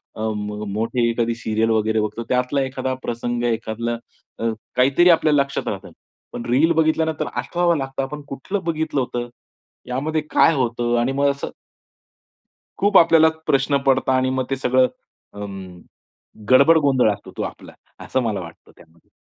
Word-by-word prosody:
अ, 110 - -7
म 105 0 -5
मोठे 115 +2 0
एखादी 115 0 0
सीरियल 110 -1 -1
वगैरे 110 0 +1
बघतो, 105 +2 -3
त्यातला 125 +2 +1
एखादा 130 0 -2
प्रसंग, 120 0 -3
एखादलं 115 0 -2 0.4
अ, 115 0 0 0.3
काहीतरी 135 +8 +4
आपल्याला 155 -4 +4
लक्षात 140 0 -3
राहतं. - - -5 0.4
पण 120 - -6
रील 145 +7 +4
बघितल्यानंतर 160 -1 +1
आठवावा 175 -1 0
लागतं 135 -2 -3
आपण 150 +2 -6
कुठलं 185 +9 -4
बघितलं 160 -3 -1
होतं, 120 -1 -4 0.6
यामध्ये 150 +5 -1
काय 165 - +5
होतं? 120 -2 0
आणि 125 +3 0
मग 140 +1 +2
असं. 140 - -5 1.3
खूप 205 0 +2
आपल्याला 165 -1 +6 0.2
प्रश्न 135 +1 +2
पडता 130 0 +3
आणि 130 0 +1
मग 130 0 -1
ते 135 - 0
सगळं 130 0 +3 0.5
अं, 95 -3 -8 0.7
गडबड 140 +6 +7
गोंधळ 130 -5 +3
असतो - - -10
तो - - -3
आपला, - - -7 0.3
असं 130 - 0
मला 110 -5 -2
वाटतं 85 -2 -12
त्यामध्ये. 85 -1 -22
130 Hz, 155 wpm, -21 LUFS, 115-140 Hz, 1.3 s, गडबड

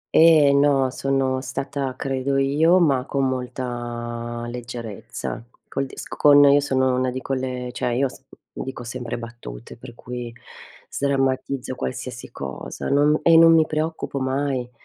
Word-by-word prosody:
Eh, 155 -4 +7
no, 140 -2 +3
sono 135 -1 0
stata 135 0 -4
credo 135 +1 -1
io, 150 +6 +4
ma 140 -8 +3
con 135 -1 0
molta 120 -2 -4
leggerezza. 120 -3 -6 0.2
Col 135 0 -3
disco - - -8
con 145 -1 +7
io 140 0 +6
sono 130 -2 +1
una 130 0 0
di 130 +1 -4
quelle, 130 -2 -3
cioè 125 - -2
io 130 +3 +2
asc 130 - -6 0.3
dico 130 -2 -6
sempre 120 0 -5
battute, 115 - -9
per 120 0 -12
cui 120 -1 -7 0.6
sdrammatizzo 135 -1 -1
qualsiasi 125 -1 -6
cosa, 65 -3 -6
non 145 +2 +3
e 165 -1 +6
non 165 0 +8
mi 160 -1 +5
preoccupo 155 -2 -3
mai. 130 -1 -1
130 Hz, 140 wpm, -23 LUFS, 125-140 Hz, 0.6 s, non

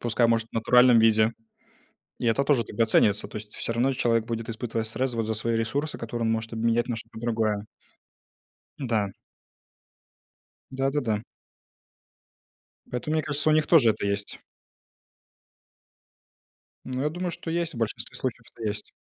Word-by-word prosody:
Пускай 120 0 +2
может 115 0 +1
в - - -58
натуральном 125 +1 +5
виде, 110 0 +4 0.9
и 120 - -2
это 125 +5 +2
тоже 135 -6 +3
тогда 115 +2 0
ценится, 105 -2 +3
то - - -9
есть 105 0 -8
всё 115 - -2
равно 125 +4 +2
человек 115 -3 +1
будет 115 0 -4
испытывать 115 -1 -3
стресс 125 +2 -2
вот 115 -1 0
за 110 - -1
свои 115 +2 0
ресурсы, 140 +7 -2
которые 115 0 -3
он 115 - +2
может 115 0 -3
обменять 115 +2 +1
на 120 - -1
что-то 110 - -9
другое. 110 -3 0 1.1
Да. 110 -7 -1 1.6
Да 135 +1 0
да 145 - 0
да. 110 -4 -1 1.7
Поэтому, 155 - -2
мне 155 - +2
кажется, 145 +1 0
у - - +5
них 155 0 +3
тоже 135 -10 +6
это 105 -1 -2
есть. 100 0 -2 2.5
Ну, 130 0 -3
я 150 - +2
думаю, 175 +2 -3
что 165 - -6
есть, 170 0 -1
в - - -7
большинстве 115 -2 -3
случаев - - -3
это 115 - -11
есть. 105 0 -5
115 Hz, 160 wpm, -26 LUFS, 110-130 Hz, 2.5 s, тоже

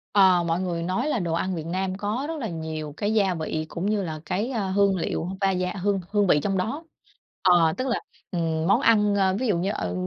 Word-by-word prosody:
À. 185 -3 +6
Mọi 170 +1 0
người 170 -2 -2
nói 190 - -1
là 245 - 0
đồ 170 -3 -2
ăn 185 +2 -1
Việt 160 -2 -5
Nam 185 +2 -2
có 215 +7 -2
rất 320 -1 -4
là 230 - -3
nhiều 160 -2 -5
cái 205 +1 0
gia 195 -4 +3
vị 155 -1 -3
cũng 170 +3 -4
như 210 -2 0
là 155 -3 -5
cái, 205 +10 -1
a, 210 -6 -1
hương 200 0 +3
liệu 165 0 -2
va 195 0 +3
da 180 0 -1
hương 200 -1 +1
hương 205 -2 +2
vị 150 - +5
trong 195 -1 0
đó. 250 - -2 0.6
Ờ, 175 -4 +5
tức 260 +1 -2
là, 240 - 0 0.3
ừm, 165 -2 -1
món 205 +7 +4
ăn, 210 -4 +4
ơ, 190 -1 +2
ví 255 - 0
dụ 190 -5 +2
như, 185 +3 -1
ờ, 90 0 -3
190 Hz, 245 wpm, -25 LUFS, 170-205 Hz, 0.6 s, À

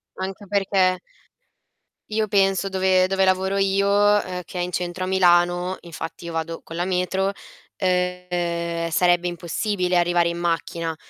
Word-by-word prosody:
Anche 190 +2 -6
perché 190 -2 +2 1.1
io 215 0 0
penso 195 -1 +2
dove 190 -1 +3
dove 190 0 +2
lavoro 190 +1 +1
io, 195 0 +2
uhm, 205 -3 +2
che 180 - -7
è - - 0
in 180 +1 -3
centro 180 +1 -3
a - - -2
Milano, 175 -1 +3
infatti 170 0 -8
io 170 - -5
vado 165 0 -4
con 165 - -8
la 175 - 0
metro, 190 +1 0 0.4
ehm, 175 -2 -1
sarebbe 175 +1 +2
impossibile 180 +2 -1
arrivare 175 0 +2
in 170 - -4
macchina. 165 -1 -2
180 Hz, 145 wpm, -23 LUFS, 175-190 Hz, 1.1 s, dove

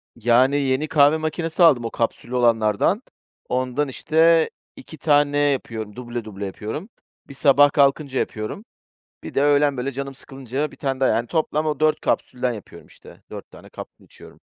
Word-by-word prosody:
Yani, 120 +4 +3
yeni 135 +2 0
kahve 150 0 +4
makinesi 160 +2 -1
aldım; 135 -8 +5
o - - -4
kapsüllü 120 +2 -3
olanlardan. 115 - +2 0.5
Ondan 130 +3 -1
işte 160 +4 +2 0.3
2 160 - -12
tane 145 -1 +2
yapıyor, 115 -7 -1
duble 120 -1 -6
duble 100 -2 -7
yapıyorum. 110 - -6 0.4
Bir 140 - -11
sabah 145 +1 +4
kalkınca 140 -1 +1
yapıyorum. 110 - -5 0.6
Bir - - -9
de 140 - +2
öğlen 145 -1 +3
böyle 135 +2 -3
canım 135 +1 -6
sıkılınca, 135 +2 -5
1 - - -16
tane 135 -2 -3
daha; 130 - +3
yani, 120 +1 0
toplam 155 0 -1
o 150 -2 -2
4 155 0 +2
kapsülden 125 -1 -1
yapıyorum, 105 -4 -11
işte. - - -17
4 - - -9
tane - - -15
kapsül - - -12
içiyorum. - - -16
135 Hz, 165 wpm, -22 LUFS, 120-150 Hz, 0.6 s, aldım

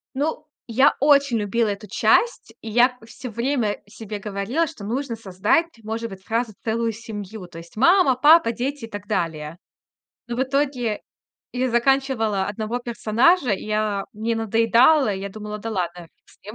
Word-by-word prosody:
Ну, 305 +2 -2 0.2
я 260 +4 +4
очень 280 -4 +4
любила 215 +2 0
эту 205 +1 -4
часть. 475 - +2
И 225 - -7
я 245 +3 +4
всё 250 +2 -8
время 235 -1 -1
себе 210 0 -7
говорила, 210 +10 -1
что 210 -8 -10
нужно 245 +2 -3
создать, 210 - +1 0.2
может 225 +1 -4
быть, 190 0 -11
сразу 230 0 -1
целую 230 0 0
семью. 210 -3 -8
То 165 - -12
есть 170 +4 -13
мама, 335 - +5
папа, 295 -2 +6
дети 260 +2 -4
и - - -18
так 205 0 -7
далее. 165 -5 -3 0.7
Но 240 - -3
в 260 - +1
итоге 265 -5 -1 0.5
я 250 0 -1
заканчивала 240 -5 +1
1 215 +3 -3
персонажа, 245 +6 +2
и 195 - -3 0.5
мне 225 +2 -2
надоедало. 230 +6 +4
Я 195 +1 -5
думала: 210 +1 -7
"Да 225 +2 -5
ладно, 175 -3 -3
фиг - - -49
с - - -22
ним, 210 +2 -9
230 Hz, 165 wpm, -23 LUFS, 205-260 Hz, 0.7 s, папа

